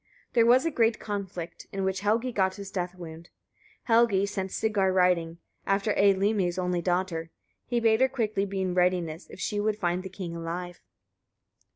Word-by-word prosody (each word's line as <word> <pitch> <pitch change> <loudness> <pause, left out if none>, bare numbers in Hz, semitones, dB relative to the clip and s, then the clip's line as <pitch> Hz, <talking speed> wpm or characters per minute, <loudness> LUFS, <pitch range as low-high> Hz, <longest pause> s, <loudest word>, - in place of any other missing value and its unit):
There 230 -1 +4
was 255 +4 +5
a 330 - +1
great 230 -4 +2
conflict, 195 -5 -6
in 195 0 -3
which 190 0 0
Helgi 225 +5 +1
got 190 -4 +1
his 200 0 -8
death 180 -1 -3
wound. 165 -2 -9 0.6
36. - - -26
Helgi 225 -4 +4
sent 195 -2 -3
Sigar 205 -4 +1
riding, 180 -3 +2 0.3
after 200 +2 +1
Eylimi's 195 -2 +2
only 180 -1 0
daughter: 175 -2 -1 0.4
he 240 -1 +1
bade 225 0 +3
her 260 - +5
quickly 215 -6 -1
be 195 0 -3
in 185 -1 -1
readiness, 180 -3 0
if - - -12
she 205 +3 -2
would 210 0 0
find 180 -2 0
the 190 - -7
king 180 -3 -6
alive. 175 +2 -5
190 Hz, 180 wpm, -27 LUFS, 180-210 Hz, 0.6 s, was